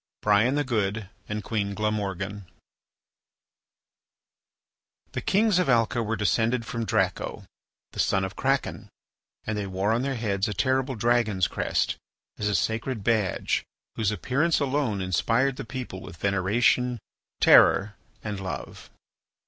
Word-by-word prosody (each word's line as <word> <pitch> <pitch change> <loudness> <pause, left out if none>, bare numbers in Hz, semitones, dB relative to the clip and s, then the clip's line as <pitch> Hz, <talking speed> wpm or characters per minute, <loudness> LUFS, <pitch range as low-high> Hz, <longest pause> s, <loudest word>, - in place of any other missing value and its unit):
BRIAN 105 +6 +4
THE 145 - +1
GOOD 105 -5 -2 0.2
AND 105 0 -3
QUEEN 100 -3 -2
GLAMORGAN 100 -2 -2 2.6
The - - -3
kings 205 -2 +3
of 180 - +1
Alca 120 0 +3
were 115 0 -1
descended 115 +3 +1
from 115 -1 -3
Draco, 95 - -1 0.5
the - - -9
son 95 - +2
of 95 0 -4
Kraken, 135 0 -1 0.6
and 110 - -2
they 105 -1 -3
wore 95 +3 0
on 115 +2 +1
their 135 0 -1
heads 105 -3 -1
a 105 - -3
terrible 130 +5 +1
dragon's 110 -5 +2
crest, - - -1 0.4
as 105 - 0
a 100 - +1
sacred 110 +1 -1
badge 110 -4 +1 0.3
whose 110 -3 +1
appearance 140 +9 +1
alone 135 -8 0
inspired 115 - +1
the - - -5
people 115 -5 -6
with 85 - -10
veneration, 110 +6 +2 0.4
terror, 100 +2 +6 0.3
and 105 -2 -4
love. 95 -1 -7
110 Hz, 130 wpm, -26 LUFS, 100-125 Hz, 2.6 s, terror